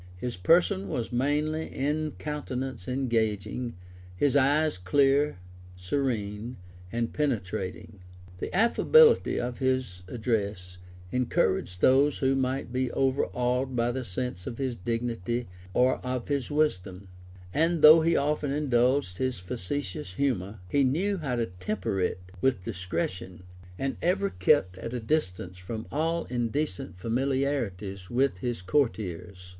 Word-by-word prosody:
His 120 +6 -4
person 100 - +3
was 115 +6 -3
manly, 150 +5 0
his 150 +2 -2
countenance 135 -7 -4
engaging, 120 -2 -1 0.4
his 140 +7 +2
eyes 145 -2 +3
clear 140 +8 +3 0.4
serene, 105 +2 -2 0.3
and 115 0 -2
penetrating. 100 -8 -3 0.4
The - - -4
affability 455 - +5
of 120 0 -3
his 130 -8 -1
address 100 -5 -2 0.3
encouraged 95 -7 0
those 140 +3 +5
who 135 0 +2
might 130 -1 -1
be 130 0 0
overawed 130 -1 0
by 120 0 +1
the 130 +1 -3
sense 105 -2 -4
of 115 - -5
his 130 -3 -2
dignity 115 +1 -2 0.2
or 125 +6 +3
of 125 0 -3
his 140 -2 -1
wisdom; 100 -11 -1 0.5
and 165 +1 +2
though 155 +2 +10
he 165 +1 +2
often 145 0 0
indulged 130 -7 +1
his 130 -1 0
facetious 90 -1 -4
humor, 105 -7 -1
he 140 +9 +2
knew 180 +10 +1
how 135 -6 -2
to 120 -1 0
temper 95 +1 -3
it 90 - 0 0.2
with 125 -9 +1
discretion, 90 -2 -4 0.3
and 135 0 -2
ever 195 +3 +1
kept 145 - +2
at 115 +5 -5
a - - -1
distance 95 - -2
from 110 +5 -6
all 165 +3 0
indecent 120 - -2
familiarities 115 -5 -1
with 125 -5 +1
his 120 -3 -3
courtiers. 95 - -1
125 Hz, 130 wpm, -28 LUFS, 95-140 Hz, 0.5 s, though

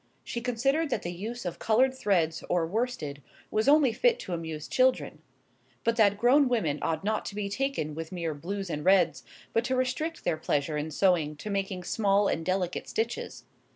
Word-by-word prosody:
She 235 - -4
considered 270 +6 +1
that - - -1
the 175 - -3
use 215 +6 -6
of 175 - -4
coloured 255 +4 +3
threads 185 -10 0
or 175 -2 +2
worsted 170 - -3 0.3
was 215 +3 +1
only 290 -5 +5
fit 480 - +3
to 180 - -5
amuse 160 -2 -5
children; 255 -11 +1 0.6
but 230 0 +2
that 205 -3 +4
grown 255 +5 +4
women 165 -12 0
ought 165 +3 -1
not 215 +1 0
to 200 - -6
be 205 -1 -2
taken 230 - -2
with 160 +1 -6
mere 170 -3 -2
blues 190 +5 -5
and 150 -1 -3
reds, 185 -3 +3 0.3
but 230 - +2
to 260 - 0
restrict 260 +6 -1
their 160 - 0
pleasure 150 -1 -1
in 150 +1 -2
sewing 160 -2 +2
to 205 +8 -6
making 195 -2 -2
small 200 +1 +2
and 165 - -1
delicate 185 0 -2
stitches. 230 +2 -3
200 Hz, 190 wpm, -28 LUFS, 165-245 Hz, 0.6 s, only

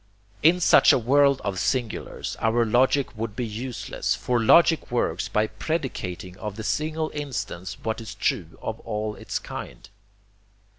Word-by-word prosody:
In 170 +4 +5
such 175 - +6
a - - +4
world 140 +3 +3
of 100 -3 -2
singulars 120 -5 -2
our 115 +1 +2
logic 130 +3 +2
would 110 -1 -4
be 125 - -2
useless, 120 +3 -3
for 125 -2 0
logic 165 +7 +5
works 105 -8 0
by 105 0 +1
predicating 105 - -4
of 105 -2 -5
the 110 - -6
single 155 +8 -1
instance 105 -11 -5
what 110 +1 -2
is 110 -2 -8
true 85 -4 -2
of 110 0 -4
all 105 -1 -3
its - - -4
kind. - - -8
115 Hz, 150 wpm, -25 LUFS, 105-135 Hz, -, such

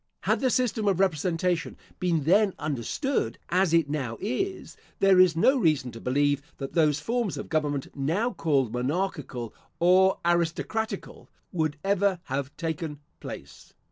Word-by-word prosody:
Had - - +1
the 260 - +2
system 230 -4 0
of 190 -3 +2
representation 175 -1 0 0.2
been 170 -4 +1
then 195 +5 +3
understood, 140 - -2
as 185 0 +2
it 165 -3 +3
now 135 -6 -3
is, 375 - -3 0.2
there 195 -1 +5
is 185 -3 +6
no 260 +11 +4
reason 145 - +1
to 115 - -10
believe 145 +2 +1 0.2
that 135 -1 -6
those 150 -3 +3
forms 230 +3 -1
of - - -6
government, 145 -3 -1
now 165 - 0
called 140 - 0
monarchical 130 - -2 0.3
or 185 +2 +5
aristocratical, 175 +6 -1 0.2
would 155 -4 -1
ever 200 -1 +2
have 140 +1 -4
taken 160 -3 -4 0.2
place. - - -10
165 Hz, 140 wpm, -27 LUFS, 145-195 Hz, 0.3 s, is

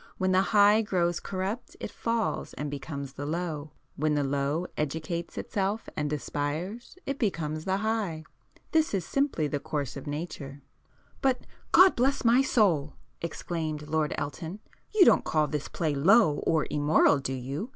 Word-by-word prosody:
When 185 -1 +1
the 185 0 +5
High 205 +1 +5
grows 175 -5 0
corrupt, 195 +5 -4
it - - -5
falls 230 -2 -2
and 145 0 -4
becomes 140 -1 -6
the 145 - -6
Low;—when 155 -2 -3
the 145 - +1
Low 140 +4 0
educates 160 +3 -3
itself 200 +2 -2
and 150 -1 -1
aspires, 155 - -3
it 275 0 -3
becomes 155 - -1
the 190 0 +1
High. 205 -7 -1 0.5
This 315 -8 +2
is 185 -3 -1
simply 275 - 0
the 145 -1 -1
course 140 -2 -3
of 140 +2 -8
nature." 145 -2 -6 0.6
"But, 265 -2 +2 0.3
God 375 +1 +7
bless 265 +1 +1
my 240 +3 +6
soul!" 185 - +2 0.3
exclaimed 160 -3 -4
Lord 155 -1 0
Elton—"you 190 - -1
don't - - +5
call 155 -1 +2
this 150 0 -3
play 155 -3 -1
low 160 +2 +5
or 160 -2 +3
immoral 145 -1 +4
do 135 -1 -3
you? 135 - -4
160 Hz, 150 wpm, -28 LUFS, 145-205 Hz, 0.6 s, God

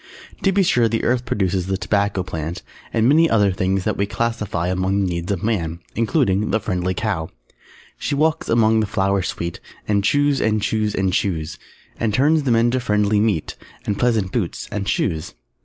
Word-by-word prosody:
] - - -21
To 195 - +3
be 195 0 +3
sure 120 -9 +3
the 115 - -1
Earth 125 +1 +1
produces 95 -5 -1
the 95 0 0
Tobacco 100 -1 0
Plant, 80 -1 -5 0.3
and 115 0 +2
many 160 +4 +5
other 105 -3 +3
things 95 +1 0
that - - -1
we 100 - 0
classify 105 -6 -2
among 95 +2 0
the 95 - +1
needs 85 +1 -3
of 95 -4 -2
Man, 85 -7 -1 0.2
including 105 - +1
the 110 - +1
"Friendly 90 -3 -2
Cow" 90 -6 -2 0.7
She - - -1
walks 160 +2 +1
among 110 -1 +4
the 110 - 0
flowers 95 -1 0
sweet 85 0 -4 0.3
And 100 -1 +1
chews 145 +5 +2
and 110 0 +2
chews 105 0 -1
and 95 -1 0
chews, 80 -6 -1 0.4
And 110 -3 0
turns 150 +5 +3
them 120 -3 +3
into 120 +3 +2
friendly 105 -3 +1
meat, 105 -7 0 0.3
_And 105 - 0
pleasant 110 -6 +1
boots 100 -8 -3
and 100 -1 -2
shoes. 80 -5 -1
105 Hz, 190 wpm, -21 LUFS, 95-115 Hz, 0.7 s, many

